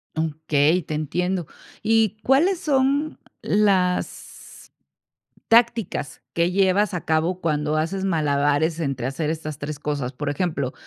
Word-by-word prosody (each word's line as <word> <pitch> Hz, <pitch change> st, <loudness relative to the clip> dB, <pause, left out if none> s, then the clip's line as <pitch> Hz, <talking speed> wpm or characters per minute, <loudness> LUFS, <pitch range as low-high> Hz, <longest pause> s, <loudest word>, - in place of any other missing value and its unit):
Okey, 160 Hz, +1 st, +1 dB
te 155 Hz, -, -6 dB
entiendo. 175 Hz, +3 st, -1 dB, 0.4 s
¿Y 220 Hz, -1 st, +2 dB
cuáles 330 Hz, +8 st, +3 dB
son 285 Hz, +1 st, +1 dB, 0.2 s
las 190 Hz, -3 st, -1 dB, 0.8 s
tácticas 230 Hz, -, +2 dB
que 170 Hz, +1 st, +1 dB
llevas 195 Hz, +1 st, +2 dB
a 180 Hz, -, -4 dB
cabo 165 Hz, +3 st, 0 dB
cuando 150 Hz, -2 st, 0 dB
haces 190 Hz, +5 st, -1 dB
malabares 150 Hz, -1 st, +1 dB
entre 135 Hz, -5 st, -2 dB
hacer 150 Hz, +3 st, -2 dB
estas 155 Hz, -2 st, -5 dB
3 145 Hz, 0 st, -5 dB
cosas? 145 Hz, -4 st, -3 dB
Por 145 Hz, +3 st, -4 dB
ejemplo, 145 Hz, -4 st, -2 dB
165 Hz, 120 wpm, -23 LUFS, 150-195 Hz, 0.8 s, cuáles